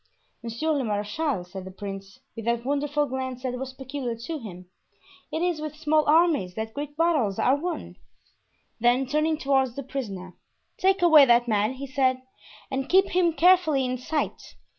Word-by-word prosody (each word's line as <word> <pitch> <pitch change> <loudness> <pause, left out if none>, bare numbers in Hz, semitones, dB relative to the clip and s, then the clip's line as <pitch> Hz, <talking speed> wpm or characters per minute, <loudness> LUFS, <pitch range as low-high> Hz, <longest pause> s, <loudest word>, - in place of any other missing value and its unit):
"Monsieur 235 +7 -2
le 285 -3 0
marechal," 210 - -2
said 185 +1 -9
the 190 - -8
prince, 195 +2 -8 0.2
with 225 -2 -7
that 235 0 0
wonderful 290 +1 0
glance 260 -1 -5
that 255 -1 -2
was 265 0 -5
peculiar 260 -2 -5
to 295 +8 -6
him, 185 -7 -9 0.7
"it 320 - -1
is 350 -4 0
with 305 -1 -5
small 310 0 +2
armies 305 - +3
that 220 0 -4
great 290 +1 -6
battles 300 - +1
are 260 - +3
won." 340 +4 -5 0.8
Then 245 +3 +3
turning 305 +3 0
toward 265 -3 +1
the 280 - -5
prisoner, 200 -9 -6 0.5
"Take 380 -1 +2
away 315 -5 +8
that 240 -1 +4
man," 215 +1 +1
he 270 +1 -7
said, 260 -1 0 0.5
"and 265 0 -2
keep 385 +1 +4
him 350 -2 +2
carefully 330 -6 +4
in 250 0 -2
sight. 300 +4 -3
265 Hz, 170 wpm, -25 LUFS, 235-305 Hz, 0.8 s, away